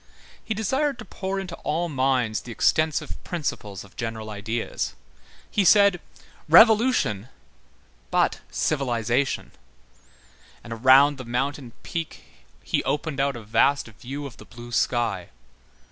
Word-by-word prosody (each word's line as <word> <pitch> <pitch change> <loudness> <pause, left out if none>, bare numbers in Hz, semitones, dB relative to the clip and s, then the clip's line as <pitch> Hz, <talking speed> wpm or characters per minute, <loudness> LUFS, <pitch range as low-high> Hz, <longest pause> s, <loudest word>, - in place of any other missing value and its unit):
He 220 - -3
desired 265 +7 0
to 220 - -9
pour 190 0 -4
into 185 -3 -6
all 165 +4 -1
minds 130 -6 0
the 120 - -9
extensive 155 +7 0
principles 105 - -4
of 100 - -18
general 110 -2 -5
ideas: 110 +3 -3 0.6
he 205 - +2
said: 200 -1 +5 0.5
"Revolution, 210 - +5 0.8
but - - +1
civilization"; 130 -2 0 1.1
and 115 - -7
around 135 +4 +5
the - - -5
mountain 125 +1 -3
peak 165 -1 -5 0.4
he - - 0
opened 145 +1 -2
out 140 -1 +1
a 120 - -8
vast 115 +5 +2
view 135 +6 -7
of 135 - -9
the - - -13
blue 120 0 -11
sky. 120 -7 0
135 Hz, 125 wpm, -25 LUFS, 115-170 Hz, 1.1 s, said